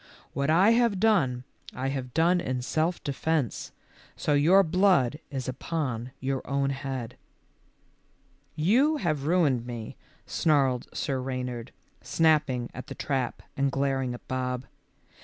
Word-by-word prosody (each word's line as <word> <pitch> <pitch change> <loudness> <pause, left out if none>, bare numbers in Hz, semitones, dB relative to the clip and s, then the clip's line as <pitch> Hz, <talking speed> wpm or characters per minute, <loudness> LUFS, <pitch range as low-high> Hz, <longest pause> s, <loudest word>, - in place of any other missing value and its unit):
What 140 +1 -1
I 185 +7 +5
have 230 -4 +3
done, 140 - +2 0.3
I 130 +2 -2
have 130 -2 -4
done 170 +5 +3
in 125 -3 -2
self 160 +6 -1
defence, 145 -2 -1 0.4
so 150 - 0
your 170 +7 +6
blood 175 -6 +3
is 135 -3 -4
upon 130 -3 -3
your 135 0 -2
own 140 0 +1
head." 135 -3 -5 1.4
"You 250 - +3
have 155 - -1
ruined 145 -9 +2
me," 115 -3 -6 0.3
snarled 135 -5 +1
Sir 135 -3 -2
Reynard, 125 -2 -4 0.3
snapping 150 -7 +2
at 130 - -8
the - - -7
trap 135 -4 -2
and 140 0 +1
glaring 135 -2 0
at - - -14
Bob. 125 0 -2
140 Hz, 130 wpm, -27 LUFS, 125-160 Hz, 1.4 s, your